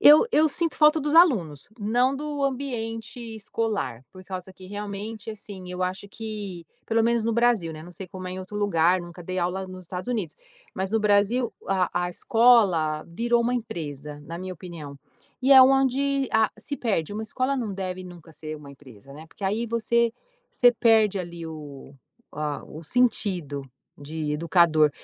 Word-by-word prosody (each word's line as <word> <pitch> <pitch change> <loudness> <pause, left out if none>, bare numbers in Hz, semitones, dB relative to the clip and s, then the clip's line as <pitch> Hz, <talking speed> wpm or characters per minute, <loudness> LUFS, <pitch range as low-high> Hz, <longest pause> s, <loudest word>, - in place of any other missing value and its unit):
Eu 300 +9 +8
eu 315 -5 +5
sinto 330 +3 -1
falta 305 +1 +5
dos 295 +1 -1
alunos, 200 - +4
não 245 +5 +2
do 290 0 -3
ambiente 245 -4 -3 0.2
escolar, 205 - -3
por 185 0 -12
causa 185 0 -7
que 185 0 -13
realmente, 205 +2 -6
assim, 195 -4 -9
eu 180 0 -3
acho 185 +2 -3
que, 205 -6 -6 0.2
pelo 225 0 +2
menos 235 -1 +2
no 230 - +1
Brasil, 235 -8 +2
né, 155 0 -9
não 175 +1 -11
sei 190 +2 -7
como 185 0 -7
é 180 - -5
em 185 - -5
outro 190 +2 -7
lugar, 180 -3 +3
nunca 175 0 -10
dei 185 +2 -4
aula 180 +2 -1
nos 185 0 -9
Estados 185 +7 -6
Unidos, 220 -8 -2 0.4
mas 190 0 -2
no 225 +1 +2
Brasil 210 +4 +3 0.2
a 185 -2 +1 0.2
a - - -4
escola 195 - +4
virou 235 +7 +1
uma 245 +1 0
empresa, 150 - -5
na 165 +3 -6
minha 185 +1 -5
opinião. 155 -5 -9 0.4
E 265 - +2
é 265 -1 +11
onde 270 +1 +3
a 220 -1 +4
se 285 - -5
perde, 205 - -1
uma 215 - -3
escola 255 +5 -1
não 225 -6 -2
deve 185 -1 -4
nunca 170 -3 -12
ser 155 0 -7
uma 145 -2 -12
empresa, 135 -2 -15
né, 155 +2 -11
porque 195 - -9
aí 215 +5 0
você 235 0 +1 0.4
você 245 -1 +5
perde 220 -4 +4
ali 170 -2 -6
a - - -5
o 145 -3 -10 0.9
o - - -12
sentido 185 - 0 0.4
de 150 +1 -4
educador. 160 -1 +4
195 Hz, 180 wpm, -25 LUFS, 170-235 Hz, 0.9 s, é